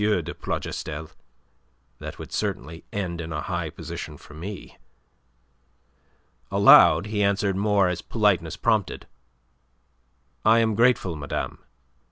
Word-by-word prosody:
de 105 0 0
Plougastel. 80 +1 -5 0.9
That - - -7
would - - -9
certainly 80 +3 -3
end 90 -4 -3
in 80 0 -6
a 75 - -3
high - - -3
position - - -7
for - - -15
me." 90 +6 -8 1.7
Aloud 80 +4 +7
he 105 -1 -2
answered 100 -1 +1
more 100 -1 +2
as 90 -1 -2
politeness 95 -7 +1
prompted. 110 -5 0 1.4
"I 110 +1 +5
am 115 -1 +2
grateful, 115 -6 +2
madame. 75 -1 -4
95 Hz, 115 wpm, -25 LUFS, 80-105 Hz, 1.7 s, Aloud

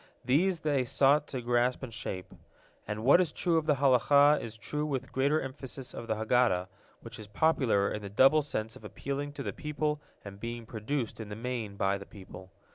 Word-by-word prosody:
These 165 +7 +2
they 145 -4 +1
sought 140 +4 +3
to 130 -3 -5
grasp 120 +2 +1
and 120 -3 -6
shape. 95 -4 -6 0.5
And 105 +1 -4
what 140 +8 +6
is 170 -4 0
true 170 +1 +1
of 155 - -7
the 150 - +4
Halakah 140 +2 +5
is 110 -1 -7
true 150 +6 -3
with 135 -4 -3
greater 140 +4 +2
emphasis 135 -1 -7
of 115 - -7
the 110 - 0
Haggadah, 110 -5 +2 0.3
which - - -9
is 105 - -9
popular 110 -4 +2
in 105 - -4
the 100 - -7
double 135 +9 +5
sense 110 -6 -4
of - - -14
appealing 140 +6 -4
to - - -6
the - - -4
people 150 0 -2 0.2
and 100 -1 -9
being 115 +1 -5
produced 115 +2 -3
in 110 -2 -7
the 105 - -6
main 115 -3 -4
by 100 0 0
the 100 - -11
people. 95 -2 -12
125 Hz, 200 wpm, -30 LUFS, 110-145 Hz, 0.5 s, what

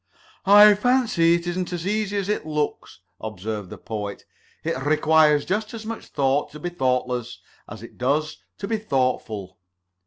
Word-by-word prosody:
"I 205 +1 +9
fancy 210 -7 +3
it 170 0 -3
isn't 180 +1 -3
as 175 -1 -4
easy 205 0 -1
as 195 -1 -2
it 210 - -1
looks," 150 -1 -3 0.2
observed 105 -2 -5
the - - -9
Poet. 105 -2 -6 0.4
"It - - -1
requires 150 0 +4
just 215 +4 -2
as 220 -1 -8
much 225 0 -6
thought 140 0 0
to 150 - -9
be 175 - -3
thoughtless 125 -5 -1 0.3
as - - -9
it - - -13
does 150 +5 0 0.2
to 200 - -5
be 220 +1 0
thoughtful." 125 - -2
155 Hz, 160 wpm, -23 LUFS, 125-205 Hz, 0.4 s, I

